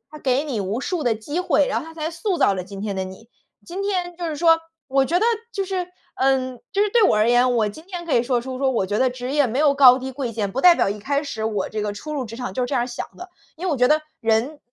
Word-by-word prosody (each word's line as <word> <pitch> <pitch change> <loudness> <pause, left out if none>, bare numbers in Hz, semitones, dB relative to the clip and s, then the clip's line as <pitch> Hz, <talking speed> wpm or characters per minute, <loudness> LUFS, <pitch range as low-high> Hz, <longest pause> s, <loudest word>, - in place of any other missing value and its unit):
它 305 - -10
给 265 +1 +1
你 255 -9 -3
无 200 +6 -2
数 355 0 -2
的 240 -4 +2
机 290 +11 -4
会， 345 -5 +2
然 - - 0
后 315 - -9
它 325 - -11
才 315 0 -3
塑 350 +3 -2
造 - - +4
了 185 - -3
今 195 +1 -9
天 205 -1 -3
的 190 - -1
你。 190 +5 -11 0.4
今 365 +3 -6
天 360 -3 -2
就 350 - -4
是 310 -2 -3
说 330 0 +4 0.3
我 270 0 +3
觉 345 +6 +1
得 445 - +2 0.3
就 395 -2 -2
是 370 -2 -2 0.3
呃， 260 -1 +1 0.2
就 400 - +2
是 420 - +1
对 470 +2 +4
我 - - +4
而 215 +2 +3
言， 245 +1 +4
我 215 -3 +2
今 260 +10 -10
天 355 -3 -6
可 330 - -4
以 235 - +4
说 245 -1 0
出 255 +1 -6
说 270 0 +2
我 230 -6 0
觉 205 +2 -1
得 260 - +3
职 250 +1 -6
业 290 -2 +3
没 245 +3 -2
有 295 -2 +5
高 260 -2 +7
低 265 +1 -5
贵 255 -3 -3
贱， 210 -3 -2
不 265 - -2
代 355 -1 +8
表 - - +1
一 205 +1 -3
开 280 +7 -1
始 220 -7 -5
我 210 -3 -1
这 215 - -4
个 210 0 -2
初 305 +9 -7
入 275 -4 -2
职 225 - -9
场 250 0 -5
就 255 - -3
是 - - 0
这 275 - -3
样 245 - +2
儿 245 - -2
想 240 - -5
的。 360 +1 -9 0.3
因 345 - -7
为 - - +1
我 - - 0
觉 250 0 +4
得 310 +1 +3 0.2
人 230 +6 +1
265 Hz, 330 characters per minute, -22 LUFS, 230-325 Hz, 0.4 s, 代